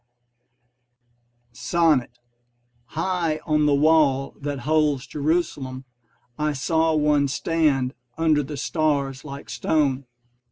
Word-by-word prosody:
SONNET 150 -5 +1 0.7
High 165 +2 -1
on 150 -1 +2
the 145 - +4
wall 145 -3 +3
that 145 -2 -4
holds 150 -1 +1
Jerusalem 145 -4 -2 0.5
I 150 0 0
saw 160 +4 +1
one 150 -2 +2
stand 140 -2 0 0.2
under 160 -2 +3
the 145 +1 -6
stars 140 -2 -1
like 140 -1 -9
stone. 140 -4 0
150 Hz, 95 wpm, -23 LUFS, 135-155 Hz, 0.7 s, the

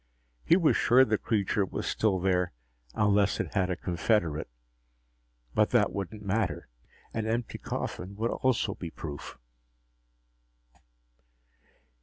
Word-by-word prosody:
He 170 - +5
was 165 -5 +3
sure 130 +2 +5
the 110 -2 0
creature 105 -2 +1
was 95 - -4
still 100 -4 +1
there, 90 -2 +1 0.4
unless 105 -1 +3
it - - -3
had 95 -3 +1
a 90 - 0
confederate. 85 - 0 1.0
But - - +3
that - - +3
wouldn't 100 +2 -5
matter. 110 +3 -1 0.4
An 110 -1 -2
empty 115 +1 -2
coffin 95 +2 -5
would 115 +3 -1
also 120 -5 +1
be 85 - -7
proof. 75 -3 -8
100 Hz, 120 wpm, -29 LUFS, 90-110 Hz, 1.0 s, He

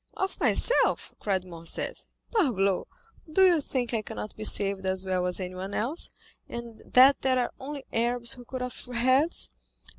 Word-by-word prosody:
"Of 380 0 -2
myself," - - +2
cried 190 -3 -1
Morcerf; 165 -2 -4 0.3
"parbleu! 205 - +2 0.5
do 380 +4 +6
you 345 -4 +5
think 250 -3 -2
I 225 - +1
cannot 215 0 -7
be 215 - -6
saved 200 -2 +2
as 190 0 -1
well 185 -1 0
as 180 - -2
anyone 185 +2 -5
else, 270 +10 -1 0.4
and 235 -2 -7
that 265 +2 +6
there 260 -1 +2
are 245 -1 0
only 280 0 -6
Arabs 235 +1 0
who 250 - -11
cut 255 +1 -5
off 250 - -7
heads? 255 +6 +2
235 Hz, 160 wpm, -28 LUFS, 195-265 Hz, 0.5 s, do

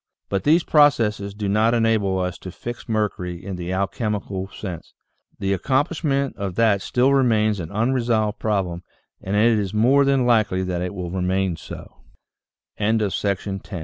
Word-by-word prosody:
But 100 -1 -2
these 165 +4 +4
processes 110 -9 +3
do 105 -1 -3
not 110 +4 +3
enable 110 -4 +2
us 90 -1 -3
to 95 - -8
fix 120 +7 -8
mercury 95 -5 -2
in 100 -2 -4
the 90 0 -5
alchemical 100 0 -2
sense; 95 -4 -8 0.4
the 100 0 -1
accomplishment 140 - 0
of 100 -3 -4
that 110 -3 +3
still 130 +6 +2
remains 110 -6 +2
an 80 -2 -5
unsolved 115 -1 0
problem, 95 -5 -1 0.4
and 95 +2 -3
it 110 +1 +4
is 100 0 -3
more 130 +6 +4
than 135 -2 +2
likely 110 -6 +2
that 90 -1 -2
it 90 +2 -4
will 90 -2 -5
remain 95 0 0
so, 80 - -10 0.8
VII - - -2
THE 105 -3 -1
UNIVERSAL 100 -1 -2
M 95 - -5
105 Hz, 165 wpm, -22 LUFS, 95-115 Hz, 0.8 s, these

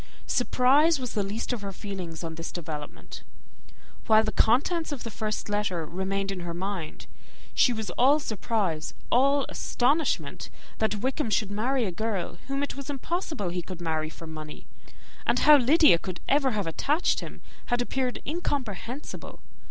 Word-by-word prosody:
Surprise 275 +6 +4
was 250 -2 -4
the 210 - +1
least 205 +5 -2
of 235 - -4
all - - -3
her - - -4
feelings 185 -4 -6
on 165 -1 -4
this 165 +1 -6
development. 155 -4 -7 0.9
While 220 0 +6
the 215 - -1
contents 300 +11 +2
of 280 -4 -4
the 230 - -5
first 215 0 -3
letter 205 -5 -1
remained 195 +4 -2
on 190 - -4
her 170 -1 -5
mind, 185 -3 -4 0.5
she 250 - +5
was 220 -3 -3
all 275 +5 +4
surprise, 205 - -2 0.2
all 275 +2 +4
astonishment, 250 - 0 0.3
that 215 -2 0
Wickham 265 -1 0
should 210 -1 +1
marry 240 +4 +1
a 190 - -2
girl 190 -3 -3
whom 275 +1 -1
it 285 - -3
was 275 +1 -7
impossible 290 - -2
he 180 +1 -2
could 175 +1 -8
marry 160 -2 -1
for 165 - -11
money; 155 -1 -8 0.6
and - - +2
how 300 - +8
Lydia 285 - +6
could 185 -1 -6
ever 275 -1 +3
have 210 -5 -1
attached 290 - +1
him - - -9 0.2
had 245 - +1
appeared 250 +1 -1
incomprehensible. 275 - -4
215 Hz, 165 wpm, -27 LUFS, 180-270 Hz, 0.9 s, how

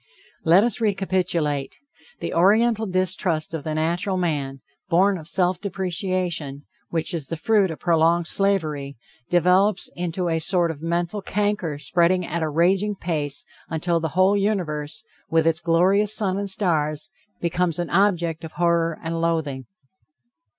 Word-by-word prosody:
Let 175 +5 +5
us 235 -1 -1
recapitulate. 180 -8 0 0.5
The - - -3
Oriental 220 +5 +3
distrust 185 -3 0
of 160 -3 -4
the 155 0 -3
natural 175 +5 0
man, 145 -6 -2 0.3
born 190 +3 +3
of 155 - -11
self 180 0 +1
depreciation, 180 -6 -2 0.2
which 165 +2 -1
is 155 -5 -4
the 165 - -4
fruit 205 +2 +2
of 160 - -5
prolonged 170 0 +2
slavery, 155 -9 -1 0.3
develops 180 +3 +2
into 175 +1 -2
a 165 -1 0
sort 170 0 +2
of 150 -2 -10
mental 170 +4 -2
canker 205 -6 -1
spreading 170 +5 +1
at 170 +1 -3
a 160 - 0
raging 190 +6 +2
pace 150 -6 -3 0.2
until 165 +1 0
the 160 0 -2
whole 190 +2 +5
universe, 190 -3 -2 0.3
with 160 0 +2
its 165 -1 +2
glorious 190 +6 +3
sun 195 -3 0
and 200 0 -2
stars, 160 -2 0 0.3
becomes 170 -1 0
an 175 -1 -3
object 175 -4 +1
of 160 - -8
horror 170 -1 +1
and 165 0 -3
loathing. 155 -6 -1
170 Hz, 145 wpm, -23 LUFS, 160-190 Hz, 0.5 s, Let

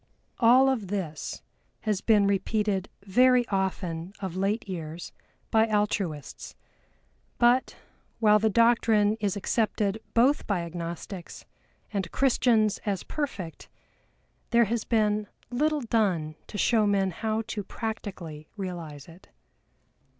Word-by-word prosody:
All 250 +3 +6
of 245 -7 0
this 180 -6 -4 0.4
has 210 -3 -1
been 210 -3 +4
repeated 200 0 0
very 250 +4 +4
often 190 -3 -2
of 190 -3 -5
late 200 +4 -1
years 165 -2 -6 0.4
by 220 0 +4
Altruists; 205 -8 -2 0.8
but, 245 +2 +3 0.4
while 210 -2 +5
the 220 +1 +2
doctrine 225 -2 +4
is 205 -2 0
accepted 210 0 0 0.2
both 255 +5 +3
by 200 -4 0
Agnostics 170 +2 -7 0.5
and 190 -4 -2
Christians 235 -5 +2
as 200 -3 -2
perfect, 210 - -5 0.8
there 235 -1 +5
has 230 +1 -2
been 210 -2 +1 0.2
little 300 +4 +1
done 195 -10 0
to 205 - -7
show 220 -1 +3
men 195 -2 +2
how 220 +4 -2
to 210 -3 -3
practically 190 -8 -6
realize 170 -7 -6
it. 170 +2 -16
205 Hz, 115 wpm, -27 LUFS, 185-225 Hz, 0.8 s, All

